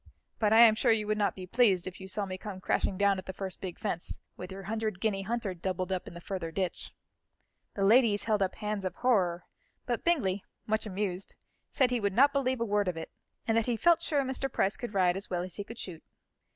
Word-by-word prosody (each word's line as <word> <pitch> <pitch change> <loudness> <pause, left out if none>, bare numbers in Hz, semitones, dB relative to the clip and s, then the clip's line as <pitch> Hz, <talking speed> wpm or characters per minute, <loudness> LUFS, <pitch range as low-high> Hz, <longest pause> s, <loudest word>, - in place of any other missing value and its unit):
But 215 -2 +2
I 225 +1 +8
am 230 -2 +9
sure 235 +2 +2
you 215 -1 +2
would 215 0 0
not 205 - +1
be 185 - -7
pleased, 195 -3 +3
if 185 0 -7
you 190 - -7
saw 200 +2 -2
me 185 -1 -5
come 200 -3 -7
crashing 185 +1 0
down 200 -1 +3
at 185 - -10
the 190 - -4
first 190 -1 -6
big 185 -3 -5
fence, 180 -6 -3 0.2
with 180 +1 -8
your 195 +1 -7
hundred 215 -1 -2
guinea 205 -2 0
hunter 220 -1 -2
doubled 185 +1 -3
up 185 -1 -2
in - - -9
the - - -7
further 170 -2 -4
ditch." 185 +1 -3 0.8
The 195 - +1
ladies 220 -1 +5
held 215 -2 +1
up 190 -1 0
hands 210 -2 -3
of 185 - -3
horror, 185 -9 +1 0.4
but 240 -2 -2
Bingley, 205 - +1 0.2
much 220 0 0
amused, 195 -1 -3 0.3
said 255 -2 +2
he 245 - +1
would 200 -2 0
not 280 +6 +5
believe 260 -3 +1
a - - +2
word 205 -2 +1
of 180 -2 -1
it, 160 - -6 0.4
and 225 - +2
that 230 0 +2
he 240 -2 +1
felt 340 +5 +4
sure 295 -4 +1
Mr. 265 0 -2
Price 195 -4 +1
could 240 -4 -6
ride 180 -2 +3
as 195 +1 -5
well 175 -1 -1
as 185 -1 -6
he 205 - -3
could 230 +3 -10
shoot. 175 -7 -7
200 Hz, 245 wpm, -30 LUFS, 185-230 Hz, 0.8 s, am